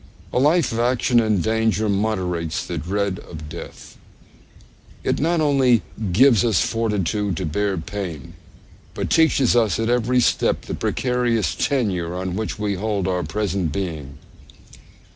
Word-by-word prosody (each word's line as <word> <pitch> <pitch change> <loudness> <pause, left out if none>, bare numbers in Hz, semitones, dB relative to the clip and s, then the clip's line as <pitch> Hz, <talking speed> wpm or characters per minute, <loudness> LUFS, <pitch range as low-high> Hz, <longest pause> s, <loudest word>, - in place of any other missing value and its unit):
A - - +2
life 155 +5 +3
of 115 - -2
action 120 0 +2
and 110 -5 +1
danger 110 -1 +1
moderates 95 -5 -1
the 85 -2 -4
dread 95 +3 -2
of 80 -3 -10
death. 85 +2 -10 1.1
It - - 0
not 165 +2 +1
only 130 - +3 0.3
gives 120 +4 +5
us 110 -7 +2
fortitude 105 -4 -1
to 95 - -2
bear 100 +5 -1
pain, 85 -5 -6 0.6
but - - -3
teaches 140 -7 +4
us 110 -6 +2
at 115 +1 0
every 125 +1 +2
step 120 - +1
the - - -7
precarious 120 - 0
tenure 95 - -1
on 90 0 -3
which 110 +1 -3
we 105 -1 -1
hold 100 -1 -2
our 90 -1 0
present 95 -6 -2
being. 75 -6 -5
105 Hz, 140 wpm, -22 LUFS, 90-120 Hz, 1.1 s, gives